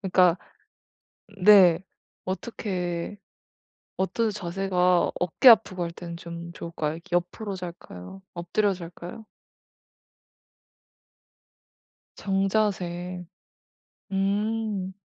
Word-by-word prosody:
그니까 180 Hz, -3 st, +4 dB, 1.1 s
네. 185 Hz, -5 st, +8 dB, 0.4 s
어떻게 185 Hz, -2 st, -3 dB, 0.8 s
어떤 220 Hz, +4 st, 0 dB
자세가 180 Hz, -2 st, +1 dB
어깨 180 Hz, +9 st, +4 dB
아프고 200 Hz, -5 st, +6 dB
할 170 Hz, -, -4 dB
때는 170 Hz, 0 st, -8 dB
좀 170 Hz, 0 st, -8 dB
좋을까요? 160 Hz, -3 st, -4 dB
이렇게 170 Hz, +1 st, -2 dB
옆으로 190 Hz, +4 st, -3 dB
잘까요 175 Hz, -, -9 dB
엎드려 190 Hz, +4 st, 0 dB
잘까요? 175 Hz, +5 st, -9 dB, 2.9 s
정자세. 190 Hz, -3 st, -1 dB, 0.9 s
음. 200 Hz, 0 st, -1 dB
185 Hz, 175 characters per minute, -26 LUFS, 170-200 Hz, 2.9 s, 네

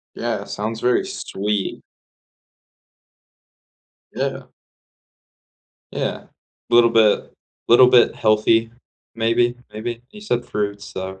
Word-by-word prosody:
Yeah, -, -, -3 dB
it -, -, -12 dB
sounds 110 Hz, +2 st, -4 dB
very 125 Hz, 0 st, +2 dB
sweet. 100 Hz, 0 st, -3 dB, 2.3 s
Yeah. -, -, -4 dB, 1.4 s
Yeah. -, -, -4 dB, 0.4 s
Little 120 Hz, 0 st, +5 dB
bit 110 Hz, -2 st, +2 dB, 0.4 s
little 125 Hz, +2 st, +7 dB
bit 125 Hz, -1 st, +5 dB
healthy, 110 Hz, +1 st, +2 dB, 0.4 s
maybe 120 Hz, +2 st, +1 dB, 0.2 s
maybe. 115 Hz, +2 st, -5 dB
You 210 Hz, -, -13 dB
said 120 Hz, -, -2 dB
fruits, 100 Hz, 0 st, -3 dB
so, 95 Hz, 0 st, -6 dB
115 Hz, 95 wpm, -21 LUFS, 105-120 Hz, 2.3 s, little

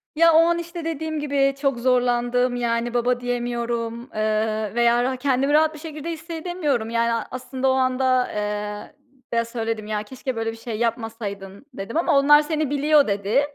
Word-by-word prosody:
Ya, 335 Hz, +1 st, +5 dB
o -, -, +6 dB
an, 340 Hz, 0 st, +2 dB
işte, 340 Hz, -1 st, -7 dB
dediğim 315 Hz, -1 st, -3 dB
gibi 275 Hz, -2 st, +1 dB
çok 275 Hz, -4 st, +1 dB
zorlandım. 245 Hz, 0 st, +1 dB
Yani, 235 Hz, 0 st, -1 dB
"baba" 245 Hz, +1 st, +1 dB
diyemiyorum, 240 Hz, -1 st, -2 dB, 0.2 s
ııı, 215 Hz, 0 st, -1 dB
veya 240 Hz, 0 st, +3 dB
ra 260 Hz, +1 st, 0 dB
kendimi 275 Hz, +2 st, +1 dB
rahat 315 Hz, +1 st, +4 dB
bir 305 Hz, -, -10 dB
şekilde 310 Hz, 0 st, -7 dB
hissedemiyorum. 320 Hz, -7 st, -3 dB
Yani, 230 Hz, 0 st, 0 dB
aslında 260 Hz, +1 st, -2 dB
o -, -, +4 dB
anda, 255 Hz, -1 st, +1 dB
eee, 210 Hz, 0 st, -4 dB, 0.4 s
eee, 230 Hz, 0 st, +1 dB
söyledim, 225 Hz, -2 st, -4 dB
ya, 210 Hz, -1 st, -2 dB
"keşke 260 Hz, +2 st, -5 dB
böyle 225 Hz, 0 st, -2 dB
bir 225 Hz, -, -11 dB
şey 225 Hz, -1 st, -5 dB
yapmasaydın" 225 Hz, -3 st, -4 dB
dedim 195 Hz, +7 st, -5 dB
ama 330 Hz, -4 st, +3 dB
"onlar 295 Hz, +2 st, +6 dB
seni 305 Hz, -1 st, -1 dB
biliyor" 290 Hz, 0 st, +3 dB
dedi. 205 Hz, +5 st, +1 dB
245 Hz, 170 wpm, -23 LUFS, 225-285 Hz, 0.4 s, o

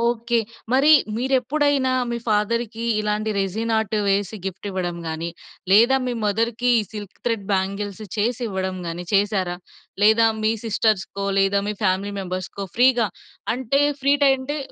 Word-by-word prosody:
Okay. 235 Hz, 0 st, +1 dB, 0.3 s
మరి 275 Hz, +4 st, +5 dB, 0.3 s
మీరెప్పుడైనా 265 Hz, +2 st, +1 dB, 0.2 s
మీ 235 Hz, -, -2 dB
ఫాదర్‌కి 225 Hz, +2 st, 0 dB, 0.2 s
ఇలాంటి 210 Hz, +1 st, -1 dB
రెసీన్ 220 Hz, +4 st, -1 dB
ఆర్ట్ 220 Hz, 0 st, -1 dB
వేసి 200 Hz, +1 st, 0 dB
గిఫ్ట్ 195 Hz, +2 st, -6 dB
ఇవ్వడం 180 Hz, -2 st, -3 dB
గాని, 160 Hz, +1 st, -4 dB, 0.4 s
లేదా 235 Hz, +6 st, +6 dB
మీ 250 Hz, -, -1 dB
మదర్‌కి 230 Hz, +4 st, +1 dB, 0.2 s
సిల్క్ 205 Hz, -3 st, -8 dB
త్రెడ్ 230 Hz, -4 st, -1 dB
బ్యాంగిల్స్ 200 Hz, +2 st, -2 dB
చేసివ్వడం 205 Hz, -5 st, -2 dB
గాని, 170 Hz, +1 st, -5 dB
చేశారా? 195 Hz, -3 st, +1 dB, 0.5 s
లేదా 220 Hz, +2 st, +6 dB, 0.2 s
మీ 220 Hz, +1 st, +3 dB
సిస్టర్స్‌కో, 210 Hz, -3 st, 0 dB, 0.2 s
లేదా 195 Hz, +1 st, +2 dB
మీ 210 Hz, -, -2 dB
ఫ్యామిలీ 195 Hz, +1 st, 0 dB
మెంబర్స్‌కో 185 Hz, +1 st, -5 dB
ఫ్రీగా, 245 Hz, -2 st, +4 dB, 0.5 s
అంటే 260 Hz, +2 st, 0 dB, 0.2 s
ఫ్రీ 280 Hz, +1 st, +4 dB
ట్రై 275 Hz, -1 st, +6 dB
అంటే 285 Hz, +3 st, -4 dB
215 Hz, 135 wpm, -22 LUFS, 195-240 Hz, 0.5 s, లేదా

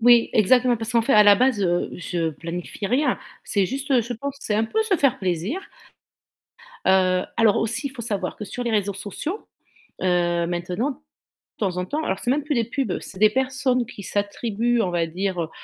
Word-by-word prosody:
Oui, 240 Hz, 0 st, +6 dB
exactement, 245 Hz, +3 st, +4 dB
parce 225 Hz, +1 st, -1 dB
qu'en 230 Hz, -, +3 dB
fait 270 Hz, -, +2 dB
à 210 Hz, -, +8 dB
la 205 Hz, -1 st, +8 dB
base, 250 Hz, 0 st, +2 dB
heu, 175 Hz, -1 st, 0 dB
je 170 Hz, -2 st, -2 dB
planifie 170 Hz, +6 st, -5 dB
rien, 255 Hz, +5 st, +1 dB, 0.3 s
c'est 200 Hz, -2 st, +1 dB
juste, 270 Hz, +6 st, -4 dB
heu, 260 Hz, -3 st, +5 dB
je 235 Hz, +2 st, -4 dB
pense, 280 Hz, +5 st, -5 dB
c'est 210 Hz, -, -1 dB
un 220 Hz, +2 st, +2 dB
peu 440 Hz, -, 0 dB
se 405 Hz, -4 st, +1 dB
faire 275 Hz, -5 st, +2 dB
plaisir. 190 Hz, -, -2 dB, 1.3 s
Heu, 185 Hz, -1 st, +3 dB
alors 225 Hz, -3 st, +4 dB
aussi 235 Hz, +6 st, 0 dB
il -, -, -8 dB
faut 255 Hz, -3 st, -7 dB
savoir 200 Hz, -5 st, -2 dB
que 210 Hz, -, -6 dB
sur 245 Hz, +4 st, -5 dB
les 235 Hz, -, -1 dB
réseaux 205 Hz, -2 st, 0 dB
sociaux, 210 Hz, -, -5 dB, 0.6 s
heu, 175 Hz, -2 st, +1 dB
maintenant 180 Hz, +9 st, -2 dB
de 265 Hz, -, -11 dB, 0.6 s
temps 190 Hz, -4 st, -1 dB
en 180 Hz, -, -1 dB
temps 300 Hz, +10 st, -2 dB
alors 190 Hz, -9 st, -2 dB
c'est 245 Hz, -, 0 dB
même 295 Hz, +2 st, 0 dB
plus 295 Hz, 0 st, -1 dB
des 235 Hz, -, +2 dB
pubs, 235 Hz, -3 st, -2 dB
c'est 190 Hz, -, -6 dB
des 215 Hz, +1 st, +6 dB
personnes 260 Hz, 0 st, 0 dB
qui 210 Hz, -3 st, -10 dB
s'attribuent, 225 Hz, +4 st, 0 dB
on 185 Hz, -, 0 dB
va 170 Hz, -1 st, 0 dB
dire, 180 Hz, +2 st, -2 dB
heu, 160 Hz, -, -3 dB
215 Hz, 210 wpm, -23 LUFS, 185-250 Hz, 1.3 s, à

